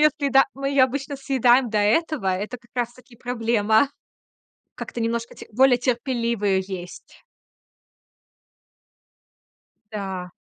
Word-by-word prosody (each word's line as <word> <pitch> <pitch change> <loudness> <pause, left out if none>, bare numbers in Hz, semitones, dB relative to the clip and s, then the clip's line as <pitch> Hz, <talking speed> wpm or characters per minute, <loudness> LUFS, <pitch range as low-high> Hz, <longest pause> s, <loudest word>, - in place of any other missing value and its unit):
редки, 300 -1 +3
да. 270 +1 +6
Мы 275 0 -3
её 275 -2 +5
обычно 275 +2 -4
съедаем 260 -3 +3
до 215 - +1
этого. 235 - +1
Это 200 +6 -2
как 235 0 -26
раз 240 -1 -1
таки 245 -1 -18
проблема. 230 0 +1 0.9
Как-то 235 - -6
немножко 230 +1 -2
те - - -11
более 255 +2 +4
терпеливо 235 -3 -1
её 190 -1 +2 0.2
есть. 180 - -14 2.7
Да. 190 -3 -5
240 Hz, 120 wpm, -23 LUFS, 220-270 Hz, 2.7 s, да